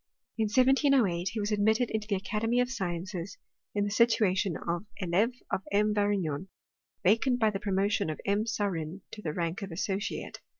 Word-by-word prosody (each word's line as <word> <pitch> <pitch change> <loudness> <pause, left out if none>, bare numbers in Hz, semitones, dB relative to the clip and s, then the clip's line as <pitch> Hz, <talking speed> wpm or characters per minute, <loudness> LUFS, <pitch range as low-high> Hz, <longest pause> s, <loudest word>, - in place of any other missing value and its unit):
In 225 - +1
1708 250 - +3
he 225 - -2
was 205 +1 -1
ad 210 - +1
mitted 220 +4 +2
into 215 -1 -2
the 205 - +1
Academy 220 +5 0
of 250 0 +1
Sciences, 180 -3 -4 0.4
in 205 - +2
the 205 - -1
situation 205 -5 +3
of 170 +3 -3
€lh)e 195 +7 +2 0.2
of - - 0
M. 210 +1 +3
Varignon, 195 -6 0 0.6
vacant 235 +6 +3
by 220 -2 +3
the 195 - -3
promotion 200 0 +1
(tf 155 - -3
M. 205 +2 +1
Saurin 190 -5 -2
to 210 - -8
the 160 - -2
rank 170 +4 -2
of 195 -2 -5
associate. 195 +4 -3
205 Hz, 175 wpm, -29 LUFS, 185-220 Hz, 0.6 s, 1708